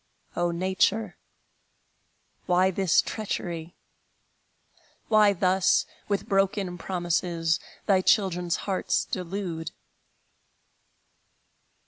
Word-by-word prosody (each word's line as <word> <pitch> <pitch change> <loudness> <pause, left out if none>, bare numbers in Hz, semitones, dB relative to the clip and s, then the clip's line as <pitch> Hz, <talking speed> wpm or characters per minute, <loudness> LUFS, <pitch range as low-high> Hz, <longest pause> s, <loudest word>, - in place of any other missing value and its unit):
O 175 0 +1
Nature, 190 +4 0 1.3
why 185 +1 +3
this 190 -2 +3
treachery? 175 -6 -4 1.3
Why 215 -2 +6
thus, 185 0 +2 0.2
with 200 -1 -1
broken 195 -2 0
promises, 175 -2 -1 0.3
Thy 190 -2 +3
children's 180 -4 +2
hearts 195 -2 0
delude? 180 -3 -4
185 Hz, 70 wpm, -26 LUFS, 175-195 Hz, 1.3 s, Why